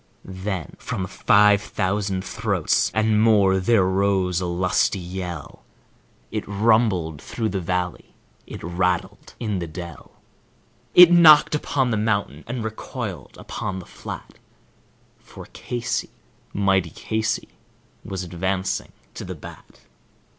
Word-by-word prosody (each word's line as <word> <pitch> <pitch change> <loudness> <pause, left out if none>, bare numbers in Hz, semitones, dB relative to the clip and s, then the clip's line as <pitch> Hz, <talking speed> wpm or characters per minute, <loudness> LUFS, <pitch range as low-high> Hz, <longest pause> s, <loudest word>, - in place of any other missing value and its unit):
Then 95 -3 -5
from 95 - -3
five 100 +2 +4
thousand 95 -1 -2
throats 100 -4 0
and 110 +1 +2
more 100 -4 +4
threr 100 +1 +3
rose 95 -2 +1
a 90 - -2
lusty 90 +3 +1
yell, 90 -3 -7 0.7
It - - -2
rumbled 100 -7 +1
through 110 -2 -3
the 95 -2 -2
valley, 90 +1 -3 0.3
it - - -9
rattled 90 +3 -2
in 105 -5 -2
the 85 - -4
dell, 85 +1 -10 0.8
It 175 -1 +10
knocked 160 -4 +7
upon 135 -4 0
the 110 - +1
mountain 100 -8 -1
and 120 -1 -4
recoiled 110 0 -6
upon 95 - -5
the 90 - -8
flat, - - -9 0.8
For - - -12
Casey, 120 -1 -3 0.4
mighty 95 -3 +1
Casey, 110 +6 -2 0.5
was 95 -2 -5
advancing 95 +2 -2 0.2
to - - -7
the - - -6
bat. - - -13
95 Hz, 120 wpm, -23 LUFS, 90-110 Hz, 0.8 s, It